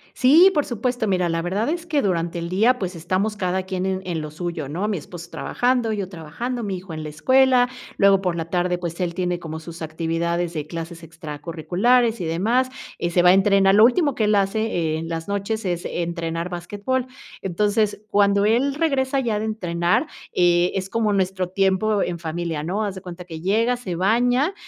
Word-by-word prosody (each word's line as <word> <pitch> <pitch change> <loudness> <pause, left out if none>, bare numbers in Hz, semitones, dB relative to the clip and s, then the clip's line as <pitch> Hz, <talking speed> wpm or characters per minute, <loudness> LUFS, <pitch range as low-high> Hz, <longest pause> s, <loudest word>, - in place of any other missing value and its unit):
Sí, 320 +9 +6
por 295 -4 +1
supuesto. 245 0 -2
Mira, 180 -3 +1
la 165 0 0
verdad 195 - -1
es 340 +1 -2
que 305 -4 +1
durante 170 -4 -1
el 170 0 -4
día, 225 +7 +3
pues, 185 -2 -3
estamos 185 +6 -1
cada 185 0 -1
quien 185 -1 -3
en 190 0 -1
en 170 -3 -2
lo 155 -1 -6
suyo, 165 -3 -4
¿no? 180 +8 -2
Mi 210 - -1
esposo 170 +2 -9
trabajando, 245 0 0
yo 195 -3 -3
trabajando, 195 +9 -5
mi 195 -3 -3
hijo 180 -2 -9
en 155 - -5
la 155 - -5
escuela, 255 - +4 0.3
luego 195 -1 +5
por 180 -3 -1
la 165 -1 -3
tarde, 180 0 0
pues, 170 0 -5
él 175 -2 -1
tiene 180 -1 -1
como 160 -2 -6
sus 165 +1 -10
actividades 165 +2 -2
de 155 -2 -4
clases 165 0 -7
extracurriculares 170 - 0
y - - -2
demás, 220 +11 +1 0.3
eh, 170 - -1
se 175 +1 +3
va 180 - +6
a - - +8
entrenar. 195 0 +4
Lo 215 +2 +8
último 285 +2 +2
que 220 - +1
él 210 0 +3
hace 195 -5 0
en 165 +1 -5
las 165 -1 -4
noches 200 +2 -2
es 175 -2 -2
entrenar 170 0 -3
basquetbol. 205 +9 -3 0.3
Entonces, 205 +3 0
cuando 200 -1 +3
él 250 +6 +2
regresa 275 -4 +1
ya 230 -5 0
de 215 - -2
entrenar, 180 - 0 0.3
eh, 175 0 +3
es 190 0 -2
como 220 -1 +1
nuestro 185 -2 0
tiempo 195 +2 +1
en 175 -1 -2
familia, 165 -1 -3
¿no? 190 +7 -1
Haz 200 -2 -3
de 190 - -8
cuenta 180 -1 -9
que 165 -2 -8
llega, 225 +7 +1
se 190 -8 -5
baña 245 - +2
185 Hz, 200 wpm, -22 LUFS, 170-220 Hz, 0.3 s, a